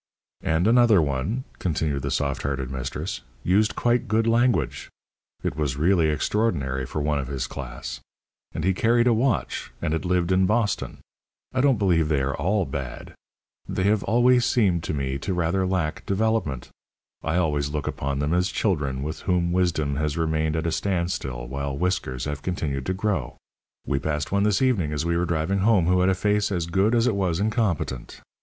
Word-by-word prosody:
"And 80 Hz, +3 st, +1 dB
another 115 Hz, -3 st, +5 dB
one," 75 Hz, -, -1 dB, 0.2 s
continued 75 Hz, -5 st, -1 dB
the 70 Hz, -, -3 dB
soft 70 Hz, 0 st, -1 dB
hearted 70 Hz, -2 st, -3 dB
mistress, 65 Hz, -1 st, -4 dB, 0.2 s
"used 105 Hz, +4 st, +2 dB
quite 120 Hz, +1 st, +1 dB
good 110 Hz, +1 st, +2 dB
language. 120 Hz, +1 st, +1 dB, 0.5 s
It -, -, -1 dB
was 70 Hz, -3 st, -1 dB
really 80 Hz, 0 st, +3 dB
extraordinary 75 Hz, -, 0 dB
for 75 Hz, -, -3 dB
one 75 Hz, -1 st, +1 dB
of 65 Hz, -, -4 dB
his 65 Hz, -2 st, -3 dB
class. -, -, -7 dB, 0.5 s
And 80 Hz, -, -4 dB
he 95 Hz, +2 st, +3 dB
carried 120 Hz, +5 st, +3 dB
a 120 Hz, -, +4 dB
watch. 115 Hz, -1 st, 0 dB
And 75 Hz, -, -1 dB
had 80 Hz, -2 st, -1 dB
lived 90 Hz, 0 st, +1 dB
in 95 Hz, 0 st, +3 dB
Boston. 110 Hz, -1 st, -1 dB, 0.5 s
I 130 Hz, -, +1 dB
don't 135 Hz, -3 st, +4 dB
believe 85 Hz, -6 st, +2 dB
they 70 Hz, -3 st, +2 dB
are 70 Hz, +1 st, -1 dB
all 95 Hz, +6 st, +1 dB
bad. 70 Hz, -5 st, -6 dB, 0.6 s
They 95 Hz, -, -1 dB
have 105 Hz, +1 st, +3 dB
always 120 Hz, +2 st, +4 dB
seemed 95 Hz, -10 st, +2 dB
to -, -, -2 dB
me 70 Hz, -1 st, -2 dB
to 90 Hz, +7 st, -2 dB
rather 90 Hz, +2 st, +1 dB
lack 90 Hz, -5 st, -1 dB
development. 95 Hz, -, 0 dB, 0.5 s
I 80 Hz, -, -1 dB
always 75 Hz, -5 st, +1 dB
look 75 Hz, -1 st, -3 dB
upon 70 Hz, 0 st, -2 dB
them 75 Hz, +3 st, 0 dB
as 90 Hz, +1 st, +2 dB
children 75 Hz, -10 st, -1 dB
with 80 Hz, +2 st, -4 dB
whom 90 Hz, -2 st, 0 dB
wisdom 85 Hz, -6 st, +1 dB
has 75 Hz, 0 st, -1 dB
remained 80 Hz, -1 st, 0 dB
at 80 Hz, 0 st, -1 dB
a 85 Hz, -, 0 dB
standstill 85 Hz, -9 st, -2 dB
while 70 Hz, +1 st, -3 dB
whiskers 75 Hz, -8 st, -1 dB
have 75 Hz, -1 st, -4 dB
continued 70 Hz, -7 st, -3 dB
to 95 Hz, -, 0 dB
grow. 95 Hz, -, -2 dB, 0.5 s
We 70 Hz, -, 0 dB
passed 75 Hz, 0 st, -2 dB
one 100 Hz, 0 st, +2 dB
this 105 Hz, +3 st, +2 dB
evening 95 Hz, -, +1 dB
as 75 Hz, +2 st, -2 dB
we 85 Hz, 0 st, +1 dB
were 85 Hz, +1 st, +1 dB
driving 85 Hz, +3 st, 0 dB
home 100 Hz, -3 st, +4 dB
who 90 Hz, +1 st, +3 dB
had 90 Hz, +1 st, +3 dB
a 95 Hz, -, +2 dB
face 105 Hz, +2 st, +1 dB
as 90 Hz, -4 st, -1 dB
good 95 Hz, +7 st, +2 dB
as 115 Hz, 0 st, +3 dB
it 125 Hz, -, +2 dB
was 90 Hz, -4 st, 0 dB
incompetent. 100 Hz, -, -1 dB
85 Hz, 190 wpm, -25 LUFS, 70-100 Hz, 0.6 s, another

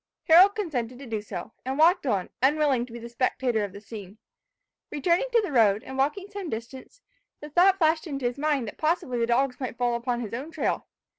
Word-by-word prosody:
Harold 365 Hz, +5 st, +7 dB
consented 255 Hz, -, -3 dB
to 275 Hz, -, -10 dB
do 220 Hz, -3 st, -3 dB
so, 210 Hz, -, -7 dB
and 265 Hz, +2 st, -3 dB
walked 330 Hz, 0 st, +4 dB
on, 195 Hz, -6 st, -1 dB
unwilling 275 Hz, -3 st, +2 dB
to -, -, -15 dB
be 235 Hz, -, -7 dB
the 235 Hz, 0 st, -8 dB
spectator 240 Hz, -1 st, 0 dB
of 200 Hz, -, -4 dB
the 200 Hz, -, -10 dB
scene. 205 Hz, -1 st, -10 dB, 0.7 s
Returning 340 Hz, -, +1 dB
to 465 Hz, -2 st, +3 dB
the 385 Hz, -, -4 dB
road, 215 Hz, -5 st, +3 dB
and 265 Hz, -, -8 dB
walking 290 Hz, +9 st, 0 dB
some 400 Hz, -4 st, -5 dB
distance, 260 Hz, -, -8 dB, 0.4 s
the 295 Hz, 0 st, -10 dB
thought 370 Hz, +4 st, +5 dB
flashed 320 Hz, -1 st, +2 dB
into 275 Hz, -4 st, -4 dB
his 245 Hz, +3 st, -2 dB
mind 290 Hz, -5 st, 0 dB
that -, -, -9 dB
possibly 310 Hz, -6 st, 0 dB
the 230 Hz, -, +1 dB
dogs 250 Hz, +2 st, +1 dB
might 255 Hz, -3 st, -5 dB
fall 245 Hz, -1 st, +1 dB
upon 240 Hz, 0 st, -2 dB
his 220 Hz, -2 st, -6 dB
own 265 Hz, +7 st, -5 dB
trail. -, -, -2 dB
260 Hz, 215 wpm, -26 LUFS, 235-315 Hz, 0.7 s, Harold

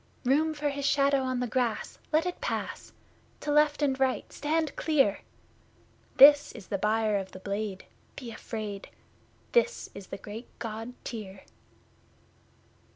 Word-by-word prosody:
Room 310 Hz, +5 st, +3 dB
for 295 Hz, 0 st, -1 dB
his 280 Hz, 0 st, -4 dB
shadow 280 Hz, -1 st, +3 dB
on 255 Hz, -1 st, -1 dB
the -, -, +1 dB
grass 240 Hz, -1 st, -1 dB
let 315 Hz, +2 st, +3 dB
it 360 Hz, -, -4 dB
pass! -, -, -3 dB, 0.5 s
To 295 Hz, -, -2 dB
left 295 Hz, 0 st, +3 dB
and 270 Hz, -2 st, +1 dB
right 265 Hz, -1 st, 0 dB
stand 310 Hz, +1 st, -1 dB
clear! 275 Hz, -11 st, +2 dB, 1.0 s
This 290 Hz, +1 st, +8 dB
is 210 Hz, -6 st, -10 dB
the 200 Hz, -, -1 dB
Buyer 215 Hz, 0 st, +2 dB
of 190 Hz, -1 st, -5 dB
the 185 Hz, -, -8 dB
Blade 200 Hz, 0 st, -4 dB, 0.3 s
be 245 Hz, -4 st, -7 dB
afraid! 215 Hz, -3 st, -6 dB, 0.6 s
This 480 Hz, 0 st, +1 dB
is 195 Hz, -2 st, -10 dB
the -, -, -6 dB
great 215 Hz, +4 st, -8 dB
God 225 Hz, +1 st, -5 dB
Tyr! 200 Hz, -5 st, -7 dB
250 Hz, 145 wpm, -29 LUFS, 210-290 Hz, 1.0 s, This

